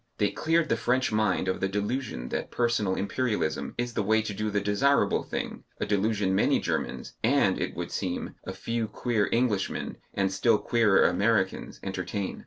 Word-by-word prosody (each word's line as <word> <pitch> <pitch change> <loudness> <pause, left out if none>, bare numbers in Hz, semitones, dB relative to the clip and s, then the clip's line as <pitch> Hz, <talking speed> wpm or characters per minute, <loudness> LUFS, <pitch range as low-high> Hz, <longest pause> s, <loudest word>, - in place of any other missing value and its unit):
They 105 -2 +2
cleared 165 0 +1
the 115 - +2
French 125 +2 +1
mind 105 -4 +1
of 95 - 0
the 95 - 0
delusion 105 - -3
that - - -3
personal 115 -6 +1
Imperialism 105 -7 -1
is 120 0 -2
the - - 0
way 110 +2 +2
to 105 - -4
do 105 +2 -2
the 105 0 +1
desirable 105 +8 +2
thing, - - -5 0.2
a - - 0
delusion 105 -1 +1
many 95 - +3
Germans - - -3
(and, - - +3
it - - -2
would - - -4
seem, 90 -2 -3
a - - -5
few 115 -1 -2
queer 110 -1 0
Englishmen 115 -5 0 0.2
and 95 -1 +1
still 110 +3 +3
queerer 105 -1 +3
Americans) 100 +1 +1
entertain. 95 +1 -3
105 Hz, 175 wpm, -28 LUFS, 95-120 Hz, 0.2 s, many